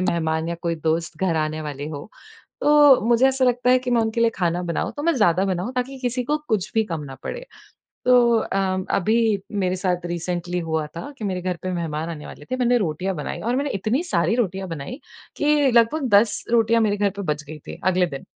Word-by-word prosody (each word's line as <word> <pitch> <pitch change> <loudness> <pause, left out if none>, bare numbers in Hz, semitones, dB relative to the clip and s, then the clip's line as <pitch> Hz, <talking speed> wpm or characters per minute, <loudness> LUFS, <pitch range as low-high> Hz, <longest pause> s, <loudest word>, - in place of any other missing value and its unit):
मेहमान 160 -3 0
या 170 - -2
कोई 170 -1 0
दोस्त 165 0 0
घर 175 -4 +1
आने 155 0 -1
वाले 145 -1 -5
हों 145 +2 -7 0.6
तो 295 -3 +6
मुझे 240 +2 +5
ऐसा 265 -1 +1
लगता 250 0 +2
है 255 - +6
कि 250 0 -4
मैं 235 - +4
उनके 220 +1 -1
लिए 230 0 +4
खाना 175 -1 0
बनाऊँ 170 - -2
तो 290 - -4
मैं 335 - +3
ज़्यादा 190 -5 +3
बनाऊँ 190 +6 -2
ताकि 260 +2 -3
किसी 250 0 -1
को 300 +4 +1
कुछ 215 -6 0
भी 220 - +3
कम 165 -6 -4
ना 135 - -8
पड़े। - - -5 0.6
तो 240 -2 +5
अ 190 -3 -1
अभी 215 +4 +2 0.5
मेरे 185 0 0
साथ 180 -2 -1
रिसेंटली 175 +1 -3
हुआ 160 -2 -2
था, 170 - -8
कि 215 - -6
मेरे 185 -2 -2
घर 180 -1 -2
पे 185 - -3
मेहमान 165 -2 -3
आने 150 -2 -7
वाले 150 - -11
थे। 255 - 0
मैंने 245 -1 +3
रोटियाँ 185 0 -2
बनाईं, 150 - -5
और 240 +3 0
मैंने 280 +1 -1
इतनी 215 - 0
सारी 190 - +1
रोटियाँ 190 -5 -1
बनाईं 165 - -6 0.4
कि 295 -2 +3
लगभग 240 +5 +3
10 205 +1 +3
रोटियाँ 230 0 +4
मेरे 205 -2 +1
घर 205 0 +1
पे 200 - -4
बच 150 0 -7
गईं 155 +1 -8
थी - - -8
अगले 185 -1 +3
दिन। 140 -4 -7
190 Hz, 220 wpm, -23 LUFS, 170-245 Hz, 0.6 s, तो